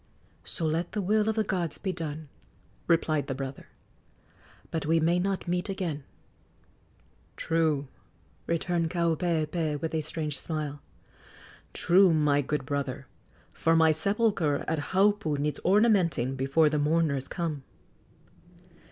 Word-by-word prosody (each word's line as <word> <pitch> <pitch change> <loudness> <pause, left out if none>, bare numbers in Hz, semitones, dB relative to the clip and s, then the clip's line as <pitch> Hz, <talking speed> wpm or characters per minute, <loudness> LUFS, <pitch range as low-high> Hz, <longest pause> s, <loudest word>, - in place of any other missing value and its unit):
"So 165 - -3
let 160 +2 -1
the 215 - -1
will 210 +3 +2
of 220 - 0
the 220 - +2
gods 175 -6 -2
be 190 - -2
done!" 155 -3 -5 0.6
replied 160 -3 +2
the 135 - -3
brother. 135 0 -6 1.0
"But 160 -2 -2
we 165 +1 +3
may 170 +3 +2
not 190 0 -2
meet 180 +3 -1
again." 170 -7 -3 1.3
"True," 160 -4 0 0.6
returned 170 0 0
Kaupeepee, 165 -2 0
with 160 +1 -4
a 160 - 0
strange 150 -2 -4
smile 150 -3 -4 0.9
"true, 180 -1 +4
my 145 -2 +3
good 145 0 -2
brother, 140 -1 -3 0.5
for 165 0 +2
my 160 -1 +5
sepulchre 175 -3 +1
at 160 -1 0
Haupu 195 -5 +2
needs 150 +1 -2
ornamenting 185 - +3
before 135 +4 +3
the 150 0 +1
mourners 150 -2 +1
come." 165 -5 -3
160 Hz, 125 wpm, -28 LUFS, 150-180 Hz, 1.3 s, my